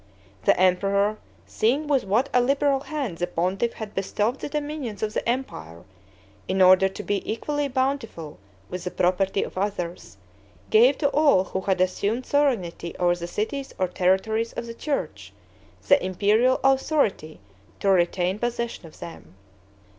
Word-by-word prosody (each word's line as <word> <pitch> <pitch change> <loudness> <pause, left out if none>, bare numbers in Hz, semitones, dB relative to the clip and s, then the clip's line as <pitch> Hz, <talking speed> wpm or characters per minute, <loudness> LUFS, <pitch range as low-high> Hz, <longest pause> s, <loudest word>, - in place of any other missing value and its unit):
The - - +4
emperor, 200 +3 +2 0.3
seeing 265 +8 0
with 280 -6 +1
what 220 +8 +2
a 250 - +5
liberal 275 +2 +2
hand 275 - -4
the 175 - 0
pontiff 185 +7 -1
had 215 -2 -7
bestowed 210 +6 -1
the - - -5
dominions 290 -8 -4
of 215 0 -2
the - - -2
empire, 85 - -4 0.6
in 190 +1 -1
order 185 +1 +6
to 195 +2 -8
be 205 -1 -1
equally 290 +6 -2
bountiful 260 - -3 0.3
with 180 -1 -6
the 180 - -3
property 190 +2 +1
of - - -6
others, 175 - -4 0.5
gave 245 +6 +6
to 285 - +1
all 285 -11 +4
who 190 0 -4
had 190 -1 0
assumed 205 +6 0
sovereignty 225 -13 0
over 175 -1 +2
the 170 -1 -6
cities 265 +9 -4
or 185 - +1
territories 190 +6 0
of - - -5
the 230 - -7
church, 280 +4 -4 0.5
the 280 - +5
imperial 210 +7 +2
authority 270 - +1 0.4
to - - -2
retain 185 +1 +2
possession 235 -6 -3
of 155 - -17
them. 165 - -10
210 Hz, 155 wpm, -24 LUFS, 185-260 Hz, 0.6 s, order